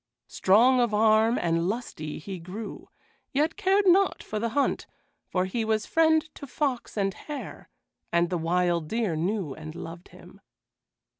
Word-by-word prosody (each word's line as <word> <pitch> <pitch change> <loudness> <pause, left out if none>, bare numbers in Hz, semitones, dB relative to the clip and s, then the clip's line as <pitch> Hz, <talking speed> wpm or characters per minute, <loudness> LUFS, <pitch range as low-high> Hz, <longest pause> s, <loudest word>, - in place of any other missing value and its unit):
Strong 240 +7 +4
of 235 -3 +2
arm 220 +2 +4
and 165 +1 0
lusty 180 -9 -5
he 185 +3 -7
grew, 195 +6 -8 0.4
yet 305 +3 +1
cared 400 0 +2
not 380 +1 +4
for 215 - -4
the 230 +2 -1
hunt, 280 - +1 0.4
for 185 0 0
he 225 +5 -2
was 220 -1 0
friend 320 -1 +3
to 280 - -10
fox 265 -5 -2
and 195 -1 +1
hare, 295 +7 -8 0.4
and 170 +1 +2
the 180 - +1
wild 170 -1 +1
deer 220 -3 -1
knew 175 -2 -2
and 155 +1 -9
loved 165 +1 -8
him. - - -16
215 Hz, 155 wpm, -27 LUFS, 175-255 Hz, 0.4 s, Strong